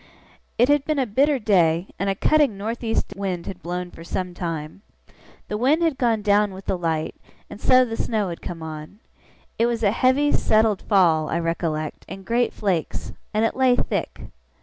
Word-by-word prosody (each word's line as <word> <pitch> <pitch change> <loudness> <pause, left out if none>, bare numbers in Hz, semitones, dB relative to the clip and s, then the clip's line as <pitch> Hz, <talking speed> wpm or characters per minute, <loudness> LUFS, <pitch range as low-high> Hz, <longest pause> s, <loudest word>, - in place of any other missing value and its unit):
It 245 - +4
had 290 0 +3
been 305 0 -1
a 265 - +2
bitter 275 +6 +2
day, 180 -6 +2
and 195 +1 0
a 195 - 0
cutting 285 -2 +2
north 225 +4 -4
east 225 -2 -1
wind 190 -3 -3
had 185 -2 -7
blown 180 +1 -4
for 165 - -12
some 180 +1 -4
time. 165 0 -5 0.7
The 210 - -3
wind 295 +8 +3
had 320 -5 0
gone 230 -4 +1
down 205 -1 +2
with 190 - -11
the - - 0
light, 165 -3 -2 0.4
and - - -10
so 255 0 +5
the 225 -2 -5
snow 215 -4 -1
had 170 - -7
come 165 -2 -7
on. 155 +4 -8 0.6
It 230 - +4
was 235 -1 -2
a 200 - +4
heavy, 260 +5 +2
settled 215 -2 +2
fall, 165 -7 +3
I 165 - 0
recollect, 165 -2 -2
in 195 - -8
great 235 +4 +1
flakes; 185 -6 -2 0.2
and 215 +1 +1
it - - -1
lay 260 -1 +4
thick. - - -3
205 Hz, 195 wpm, -23 LUFS, 175-240 Hz, 0.7 s, so